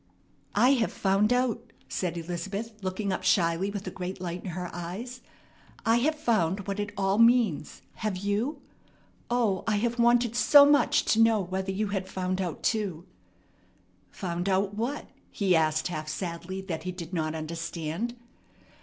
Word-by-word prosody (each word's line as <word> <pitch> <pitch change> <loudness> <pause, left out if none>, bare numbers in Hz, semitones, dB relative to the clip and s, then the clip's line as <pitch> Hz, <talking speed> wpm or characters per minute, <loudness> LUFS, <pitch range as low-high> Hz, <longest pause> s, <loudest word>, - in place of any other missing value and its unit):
"I 250 - +5
have 250 -5 +2
found 200 +3 +2
out," 245 -2 0 0.2
said 175 -2 -2
Elizabeth, 195 +6 -4
looking 190 +1 -2
up - - -2
shyly 170 +1 +2
with 200 -1 -5
a 185 - -4
great 185 +1 -5
light 175 0 -5
in - - -5
her 180 +1 -4
eyes. 200 +9 -6 0.6
"I 225 +1 +4
have 300 +6 +1
found 200 - 0
what 200 0 -3
it 205 0 -2
all 195 +1 +1
means. 230 -10 +3
Have 215 -4 -2
you? 205 +9 -2 0.7
O, 230 -6 +1
I 215 - +2
have 235 +3 -1
wanted 235 0 +3
so 285 +3 +8
much 290 0 +4
to 225 - +2
know 225 -1 +5
whether 190 +1 -3
you 205 +2 -1
had 195 -2 -2
found 185 0 -2
out 175 -4 -4
too!" 195 -7 -1 1.0
"Found 175 - -3
out 195 +1 +1
what?" 235 +7 -3 0.2
he 195 -4 +1
asked 155 +1 +2
half 155 -3 -4
sadly 175 +3 -4
that 170 -5 -4
he 185 +2 -4
did 175 -1 -8
not 160 -2 -1
understand. 165 +6 -4
195 Hz, 165 wpm, -28 LUFS, 175-225 Hz, 1.0 s, so